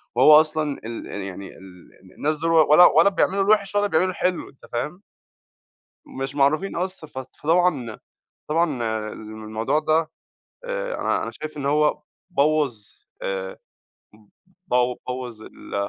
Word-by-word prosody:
وهو 150 +5 +8
أصلًا 155 -2 -3
ال 115 0 -6
ال 100 - -6
يعني 95 0 -7
ال 95 -2 -15
ال 95 -1 -18
الناس 155 +2 0
دوُل 165 +2 -1
و 160 -2 +5
ولا 175 +4 +9
ولا 170 +5 +6
بيعملوا 195 0 +1
الوحش 205 -1 +2
ولا 205 0 +3
بيعملوا 185 +1 +2
الحلو 180 0 -2
أنت 135 - -18
فاهم؟ 150 +10 -3 1.1
مش 135 +1 -5
معروفين 150 +7 +1
أصلًا 180 -3 -4
ف 130 - -14
فطبعًا 145 -2 0 0.5
طبعًا 165 +1 +2 0.4
الم 110 0 -9
الموضوع 110 +7 -1
ده 155 +1 +1 0.5
آآ - - -3
أنا - - 0
أنا - - -4
شايف 155 0 -8
إن 140 - -4
هو 150 +1 +2 0.3
بوّظ 150 -6 +2 0.5
آآ 95 -1 -4 0.5
ب 105 - -20 0.5
بو 125 -4 +2
بوّظ 125 -3 -5
ال - - -12
150 Hz, 150 wpm, -23 LUFS, 125-170 Hz, 1.1 s, ولا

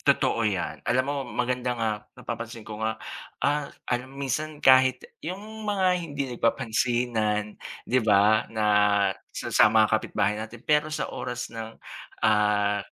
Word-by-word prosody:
Totoo 115 -2 +2
'yan. 95 -3 -3
Alam 125 +1 +3
mo, 145 +1 -2
maganda 125 0 -1
nga 115 -1 0 0.3
napapansin 115 -1 -6
ko 110 0 -8
nga. 110 0 -1 0.5
Ah, 145 0 +1 0.2
alam 125 +1 -2
mo 140 - -4
minsan 150 +4 -2
kahit 130 -2 +5 0.2
'yung 205 +6 -7
mga 195 -2 +1
hindi 145 -4 -4
nagpapansinan 115 -3 0 0.3
di 130 - +2
ba 105 0 +4
nga 110 -1 -1 0.6
sa - - -6
sa - - +7
mga 110 0 +3
kapitbahay 105 -1 +1
natin, 115 +3 -9
pero 150 0 +2
sa 155 - -3
oras 125 0 -5
ng, 115 0 -7 0.5
ah, 105 -1 +3
120 Hz, 145 wpm, -26 LUFS, 110-135 Hz, 0.6 s, sa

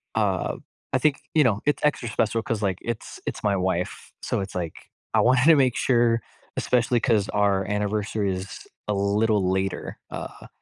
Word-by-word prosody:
uh, 100 -5 0 0.4
I - - +5
think, 140 +2 +2 0.2
you 155 - +6
know, 105 -6 +2
it's 145 - +1
extra 150 -5 +1
special 115 +1 0
'cause, 115 -2 -2
like, 95 -3 0
it's 120 -2 -5
it's - - -4
my 100 -2 +2
wife, 90 -1 -2
so - - -1
it's 95 - -6
like, 85 -3 -5 0.2
I - - +4
wanted 125 +1 +4
to 165 0 +8
make 130 -4 +3
sure 120 -2 +3 0.4
especially 120 0 +2
'cause 110 -4 +2
our 100 -2 +2
anniversary 105 -1 -1
is 95 +1 -7 0.2
a 105 - +1
little 100 0 +2
later, 95 0 -2
uh, - - -7
105 Hz, 175 wpm, -25 LUFS, 100-120 Hz, 0.4 s, to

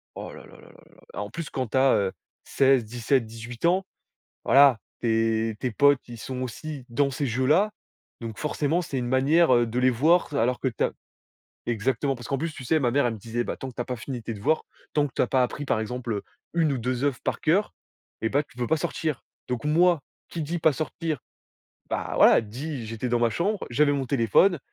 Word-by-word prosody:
Oh - - -7
là - - -11
là - - -16
là - - -16 0.4
là, - - -4
en 100 - -5
plus 165 +6 -6
quand 130 -3 -3
tu 130 - -2
as, 135 0 +5
heu, 100 -2 +1 0.3
16-17-18 120 -2 0
ans, 185 +2 +3 0.6
voilà 135 -4 +6 0.2
tes 115 -1 +1
tes 125 - -2
potes 145 +3 +3
ils 120 -1 -9
sont 130 +2 -5
aussi 135 +2 -6
dans 140 +3 +1
ces 140 +1 -2
jeux 130 +2 0
là, 190 +9 +4 0.5
donc 115 -2 -6
forcément 150 +2 0
c'est 140 -6 -4
une 120 - -2
manière, 135 +4 +4
heu, 120 -1 +3
de 115 +2 -3
les 130 0 +4
voir 155 +6 +3
alors 125 -1 +1
que 130 - +1
tu 115 - -1
as - - 0 0.7
exactement, 120 +4 0
parce 120 -2 -9
qu'en 135 -2 -1
plus, 165 -1 -3
tu 135 - -9
sais, 155 +6 +2
ma 125 -5 +1
mère 140 -2 +3
elle 115 - -1
me 110 - -9
disait: 115 +3 -3
«Bah - - -4
tant 135 - -6
que - - -17
tu - - -6
as - - 0
pas 125 -1 -4
fini 125 +1 -6
tes 115 - -4
devoirs, 130 +11 +1 0.3
tant 145 -1 +2
que - - -21
tu - - +2
as - - +2
pas 130 +1 +2
appris 145 +4 -2
par 115 -5 0
exemple, 120 +1 -4
heu, 100 - -3 0.3
1 160 -4 +2
ou 135 - -1
2 125 +2 -2
œuvres 140 -4 0
par - - -1
cœur 185 +7 +1 0.5
et 110 - 0
ben 145 +5 +1
tu - - -22
peux 120 -1 -2
pas 160 - +3
sortir», 160 -2 -3 0.2
donc 125 +1 -3
moi 165 0 +3 0.3
qui 165 - -4
dit 165 +4 -2
pas 160 - +4
sortir, 155 0 -3 0.7
bah, - - -2
voilà - - +6
dit 125 +3 -6
j'étais 115 +3 -4
dans 120 0 +2
ma 120 -1 +3
chambre, 195 - -1
j'avais 145 +4 +3
mon 135 -2 -1
téléphone, 140 - +3
130 Hz, 230 wpm, -26 LUFS, 120-150 Hz, 0.7 s, voilà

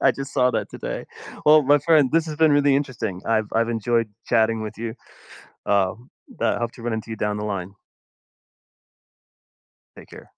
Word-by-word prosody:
I - - +6
just 140 +1 -7
saw 125 -2 +3
that - - -3
today. - - -5 0.4
Well, 150 0 +7
my 145 +2 +4
friend, 150 -3 +3
this 165 0 +2
has 155 -2 -5
been 160 -1 +4
really 145 -1 +4
interesting. 115 -9 -2
I've 110 -2 +1
I've 115 +1 +1
enjoyed 115 0 0 0.2
chatting 110 0 +2
with 110 - -7
you. 115 0 -4 0.7
Um, 100 +4 0 0.3
but - - +1
I - - -5
hope 120 -1 -2
to - - -13
run 120 -1 -2
into 110 0 -5
you 110 - -4
down 105 0 -1
the 105 - -4
line. 95 -2 -4 2.2
Take - - -14
care. - - -13
115 Hz, 185 wpm, -23 LUFS, 110-140 Hz, 2.2 s, Well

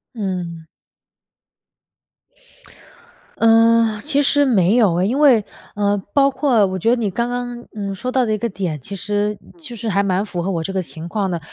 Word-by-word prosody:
嗯。 180 -6 -4 2.7
呃， 225 -1 +4
其 285 -1 +1
实 285 +1 +3
没 205 -6 +3
有 205 -8 +3
哎， 185 - +2
因 255 +7 0
为 255 -8 +5 0.3
呃， 205 -1 0
包 275 -1 +3
括 255 -7 +2
我 185 -1 -3
觉 225 - +1
得 240 - +4
你 220 -5 -2
刚 235 +5 -2
刚， 245 -1 -5
嗯， 200 -2 -4
说 250 +6 -4
到 255 -1 +2
的 220 - -2
那 215 - +1
个 235 +2 -2
点， 175 -7 -4
其 200 - -7
实 205 +2 -2 0.2
就 295 -7 -9
是 225 0 -6
还 200 0 +2
蛮 195 0 0
符 175 -4 -4
合 190 - -3
我 170 -4 -2
这 195 +4 -5
个 190 - 0
情 165 -1 -8
况 195 +1 -2
的。 170 - -2
210 Hz, 205 characters per minute, -19 LUFS, 190-240 Hz, 2.7 s, 为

